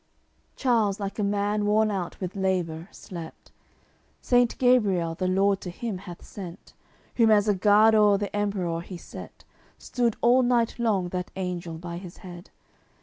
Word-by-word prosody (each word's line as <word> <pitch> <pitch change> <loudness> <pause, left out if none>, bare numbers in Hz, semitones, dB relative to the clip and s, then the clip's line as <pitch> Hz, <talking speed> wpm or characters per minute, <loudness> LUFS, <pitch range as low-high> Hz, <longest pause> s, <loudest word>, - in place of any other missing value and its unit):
CLXXXV - - -42
Charles, 225 -6 +1
like 200 +1 -5
a - - +1
man 205 +1 0
worn 215 +1 +3
out 185 -4 -4
with 185 0 -5
labour, 180 -4 -1
slept. 170 -3 -10 0.7
Saint 245 -1 +2
Gabriel 205 -10 +3
the 185 +2 -2
Lord 195 +1 +2
to 180 - -6
him 200 +2 -5
hath 180 -3 -10
sent, 180 -4 -10 0.4
Whom 230 -2 +5
as 210 -1 +4
a 210 - +4
guard 210 +3 +5
o'er 210 -2 +5
the 205 0 -4
Emperour 190 -5 -1
he 180 +1 -8
set; - - -11 0.3
Stood 240 -3 -1
all 245 +2 +5
night 240 -2 +1
long 200 -6 +1
that 180 0 -4
angel 180 -3 -4
by 170 +1 -6
his 175 -1 -10
head. 175 +1 -10
200 Hz, 165 wpm, -26 LUFS, 180-215 Hz, 0.7 s, Whom